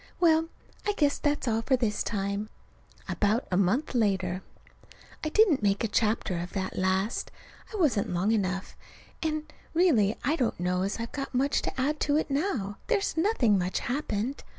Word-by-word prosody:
Well, 325 -1 +4 0.3
I 415 - 0
guess 290 -7 +1
that's 290 -3 0
all 225 -1 +1
for 260 +3 +2
this 225 -4 0
time. 200 0 -2 0.6
About 215 +4 +1
a - - +2
month 200 +12 +1
later. 190 -6 +1 0.8
I 310 - 0
didn't 370 - +4
make 200 0 +1
a - - +2
chapter 210 -4 0
of 175 +1 -6
that 190 -2 -3
last. 190 +3 0 0.4
It 430 - -4
wasn't 270 - +2
long 180 +5 +1
enough. 195 -3 -1 0.5
And, 310 -1 -2 0.2
really, 245 - +4
I 295 +6 +1
don't 245 - 0
know 180 +1 0
as 195 +4 -2
I've 230 0 -4
got 275 -2 -5
much 275 +3 +2
to - - -4
add 295 +4 0
to 290 0 +2
it 310 - -1
now. 270 - -1
There's 415 -4 +1
nothing 320 - +3
much 180 +1 -1
happened. 250 -1 -2
230 Hz, 175 wpm, -28 LUFS, 200-300 Hz, 0.8 s, Well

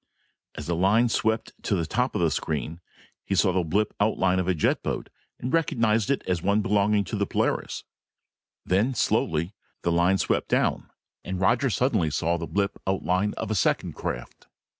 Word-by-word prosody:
As - - -6
the 85 - -1
line 105 +7 +3
swept 110 0 0
to 100 - 0
the 85 -3 -1
top 125 +10 -1
of - - 0
the 85 -2 +2
screen, 80 +3 -3 0.4
he 100 - -1
saw 95 0 +4
the 95 - +2
blip 100 +6 0
outline 95 -3 +2
of 90 - -1
a 95 - +2
jet 75 - +1
boat - - -3 0.3
and 125 +2 -4
recognized 115 -10 +2
it 140 - 0
as 90 -3 -1
one 100 +3 +2
belonging 105 +1 +2
to - - -5
the - - 0
Polaris. - - -1 0.8
Then, 110 +8 +1
slowly, 85 -4 0 0.3
the 85 - +1
line 90 +3 +3
swept - - 0
down - - 0 0.3
and 95 0 -4
Roger 120 +8 +2
suddenly 110 - +1
saw 85 +3 0
the 85 - -4
blip 100 -1 -1
outline 95 +1 0
of 110 -1 -3
a - - +2
second 100 - +1
craft. - - -6
95 Hz, 185 wpm, -26 LUFS, 85-110 Hz, 0.8 s, saw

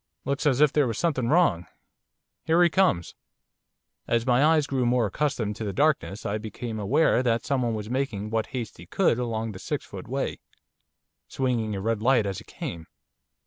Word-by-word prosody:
Looks 140 +2 0
as 135 -1 +2
if 150 -2 +5
there 145 -3 +3
was 115 -2 -3
something 140 -8 0
wrong. 150 - +3 0.8
Here 165 +2 +4
he 175 - +5
comes.' 170 - +2 0.9
As 115 0 +1
my 125 +1 +3
eyes 155 -1 +4
grew 135 -3 -1
more 120 -1 +2
accustomed 110 -2 -1
to 110 - -5
the 100 -2 -3
darkness 140 -5 0
I 105 +2 -1
became 110 +1 -6
aware 125 +6 +3
that 115 -2 0
someone 125 -5 0
was 105 -1 -5
making 115 -5 -2
what 110 -1 0
haste 120 -4 -5
he - - -12
could 175 -11 +2
along 115 -2 -2
the 95 - -9
six - - -4
foot - - -9
way, - - -3 0.9
swinging 120 -5 -1
a 95 - -4
red 110 +1 -1
light 120 -2 +3
as 100 -2 -3
he - - -14
came. 80 -1 -7
120 Hz, 185 wpm, -26 LUFS, 110-140 Hz, 0.9 s, if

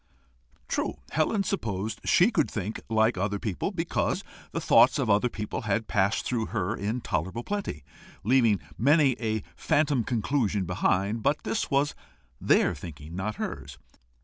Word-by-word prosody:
True, - - -1 0.2
Helen 195 +6 +1
supposed 110 - -3
she 190 +7 +5
could 160 - +1
think 105 +1 -4
like 110 -2 +2
other 100 +1 0
people, 105 - -2
because 175 -4 -1 0.3
the - - -2
thoughts - - +5
of 110 - +1
other 105 +4 +3
people 105 -2 -4
had 110 +1 -1
passed 100 +1 +1
through 115 -3 -1
her 105 -1 -1
in 110 +5 -2
tolerable 95 +5 -2
plenty, 200 - -4 0.4
leaving 115 -4 +4 0.2
many 145 +3 +5
a 110 -2 -1
phantom 145 -5 +1
conclusion 110 -4 0
behind; 100 +4 0
but 145 +7 +1
this - - -1
was 140 +1 +2 0.5
THEIR - - +3
thinking, 80 0 -9
not 105 +3 -3
hers. - - -6
110 Hz, 145 wpm, -27 LUFS, 100-135 Hz, 0.5 s, she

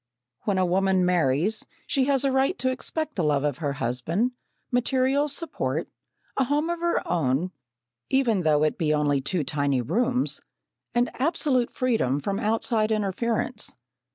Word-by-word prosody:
When 200 -3 +1
a 185 - +3
woman 190 +1 +2
marries, 180 +4 +1 0.2
she 265 -2 +2
has 275 -1 +2
a 270 - +2
right 265 +8 +2
to 260 - +1
expect 310 +4 -3
the 180 - -1
love 145 -2 +2
of 145 -3 -1
her 145 -4 -1
husband, 140 - -1 0.4
material 260 +3 +2
support, 310 +4 -1 0.5
a 270 - +3
home 295 +5 0
of 345 - -3
her 340 0 0
own, 165 +1 0 0.6
even 250 -7 +2
though 155 -2 +3
it 155 - 0
be 155 -2 +2
only 145 -2 +1
two 160 +4 -1
tiny 140 -2 0
rooms, 245 - 0 0.5
and 240 +1 +2
absolute 265 -5 +2
freedom 225 - +1
from 195 +6 -2
outside 220 0 +1
interference. 220 +3 -1
215 Hz, 155 wpm, -26 LUFS, 155-260 Hz, 0.6 s, a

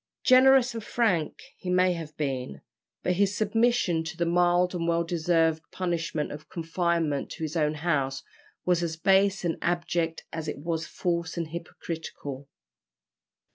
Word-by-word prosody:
Generous 260 -1 +6
and 225 -2 -5
frank 200 -10 0 0.2
he 185 - -6
may 180 0 +4
have 160 -3 -7
been, 130 - -3 0.4
but 180 -1 +1
his 200 +1 +2
submission 215 -5 +2
to 160 - -6
the 170 - +1
mild 175 +1 +3
and 170 -2 -2
well 170 0 +2
deserved 165 -1 +1
punishment 170 -4 -2
of 150 +1 -9
confinement 165 -3 -1
to - - -7
his 155 +1 -3
own 155 -2 +1
house 140 -4 -1 0.4
was 180 -1 +2
as 165 -1 -2
base 195 +2 +3
and 165 - -1
abject 170 -1 -1
as 160 -1 -4
it 150 - -3
was 165 +2 -3
false 170 -2 -2
and 165 -2 -2
hypocritical. 160 -4 -7
170 Hz, 150 wpm, -27 LUFS, 160-180 Hz, 0.4 s, Generous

